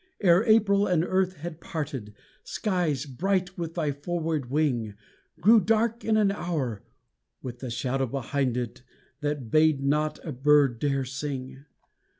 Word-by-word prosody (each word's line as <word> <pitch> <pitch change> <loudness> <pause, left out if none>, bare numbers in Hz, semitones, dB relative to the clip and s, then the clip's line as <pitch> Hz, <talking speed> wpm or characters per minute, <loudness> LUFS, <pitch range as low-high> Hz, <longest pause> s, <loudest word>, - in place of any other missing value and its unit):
Ere 180 0 +5
April 205 -3 +4
and 175 -4 +2
earth 185 +1 +1
had 165 +1 -8
parted, 135 -10 -5 0.3
Skies, 175 - -1
bright 180 +6 -1
with 165 -1 -5
thy 155 -4 0
forward 155 -2 -3
wing, 125 -8 0 0.4
Grew 220 +7 +7
dark 225 +3 +1
in 220 -1 +2
an 205 -2 +3
hour 150 - -3 0.6
with 125 -1 -6
the 130 - -5
shadow 130 +2 -1
behind 135 0 -1
it, 120 -1 -4 0.4
that 145 -6 -3
bade 155 -3 +4
not 150 +2 +1
a 160 - -4
bird 140 -2 +3
dare 140 -1 0
sing. 135 0 -6
150 Hz, 145 wpm, -27 LUFS, 135-180 Hz, 0.6 s, Grew